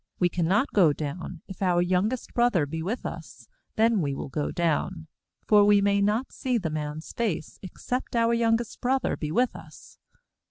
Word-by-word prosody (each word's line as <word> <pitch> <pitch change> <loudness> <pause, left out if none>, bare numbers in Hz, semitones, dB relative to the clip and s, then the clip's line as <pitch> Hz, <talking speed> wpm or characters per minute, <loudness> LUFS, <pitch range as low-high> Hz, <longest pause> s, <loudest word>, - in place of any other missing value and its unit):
We 180 - +2
cannot 180 - +1
go 170 -8 +5
down; 160 +3 -6
if 190 - -10
our 180 -2 +2
young 180 +4 +2
est 255 - -6
brother 240 -10 +3
be 160 +3 -5
with 205 +9 -3
us, - - -8 0.3
then 225 -2 +3
will 140 -3 -2
we - - -10
go 145 +2 -2
down; 170 0 -1 0.4
for 210 -1 +6
we 205 0 +5
may 200 0 +2
not 215 +6 0
see 255 -2 -1
the 170 -8 -3
man's 150 0 -5
face, 205 -10 -3
except 245 +7 -5
our 230 0 +3
youngest 230 -1 0
broth 260 +1 +1
er - - 0
be 150 -1 -4
with 245 +8 +1
us. - - -13
195 Hz, 190 wpm, -26 LUFS, 165-230 Hz, 0.4 s, for